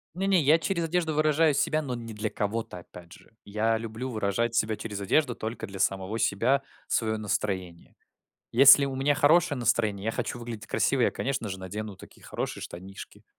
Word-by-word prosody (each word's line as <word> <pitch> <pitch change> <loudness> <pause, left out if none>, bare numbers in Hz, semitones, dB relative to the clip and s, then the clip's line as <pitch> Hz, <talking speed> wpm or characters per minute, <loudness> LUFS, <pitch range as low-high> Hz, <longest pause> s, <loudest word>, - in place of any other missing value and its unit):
Не-не, 190 -1 +2
я 155 +3 +4
через 170 0 -1
одежду 165 -1 0
выражаю 155 0 +3
себя, 155 +3 +1
но 130 -4 -4
не 115 -1 -7
для 105 0 -3
кого-то, 105 -3 -3
опять 85 -1 -14
же. - - -18
Я 110 +2 0
люблю 115 +3 -5
выражать 115 +1 -1
себя 110 -1 +1
через 105 -2 -6
одежду 120 +6 +1
только 110 -1 -5
для 95 -1 -9
самого 95 +3 -1
себя, 115 +6 +1 0.2
свое 110 -1 0
настроение. 95 -4 -4 0.6
Если 140 +3 +8
у 135 - -3
меня 135 +2 +1
хорошее 145 0 +3
настроение, 115 -4 0
я 110 - +1
хочу 120 - -4
выглядеть 115 -2 -7
красиво, 135 - +1
я, - - +3
конечно 125 -5 -3
же, 95 - -5
надену 100 +2 -6
такие - - -16
хорошие - - -5
штанишки, 95 +3 -10
115 Hz, 180 wpm, -27 LUFS, 105-140 Hz, 0.6 s, Если